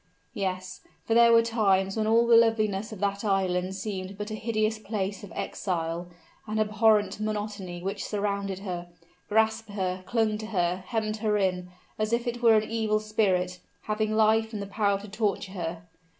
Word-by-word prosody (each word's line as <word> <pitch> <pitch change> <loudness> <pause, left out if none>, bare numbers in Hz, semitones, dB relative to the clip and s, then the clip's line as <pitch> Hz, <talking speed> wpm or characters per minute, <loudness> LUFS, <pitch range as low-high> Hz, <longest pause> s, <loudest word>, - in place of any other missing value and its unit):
Yes; 185 -3 -3 0.2
for 225 - +1
there 235 0 +7
were 230 0 +6
times 195 -4 +2
when 215 -1 0
all 230 +1 +4
the 235 0 +6
loveliness 215 -2 +3
of 215 - -8
that 200 0 -1
island 190 -2 0
seemed 195 -1 -5
but 210 +1 -5
a - - -3
hideous 215 0 -1
place 200 -2 -3
of 200 - -9
exile, 170 -2 -3 0.4
an 215 0 -2
abhorrent 215 -1 +3
monotony 205 -4 -4
which 195 +1 -3
surrounded 200 -2 -2
her 175 -2 -4 0.4
grasped 220 +1 +2
her 185 -2 -3
clung 220 -3 +1
to 215 - -6
her 180 -3 0
hemmed 220 -2 -1
her 215 -1 +1
in, 180 -2 0 0.3
as 215 0 0
if 235 +1 +1
it 240 0 -3
were 230 -2 +6
an 215 0 +2
evil 220 -2 0
spirit, 190 -4 0 0.2
having 215 0 -1
life 220 +1 +3
and 210 - -3
the - - -5
power 200 0 0
to 205 - -10
torture 200 -2 -1
her. 170 -3 -5
210 Hz, 180 wpm, -27 LUFS, 190-220 Hz, 0.4 s, there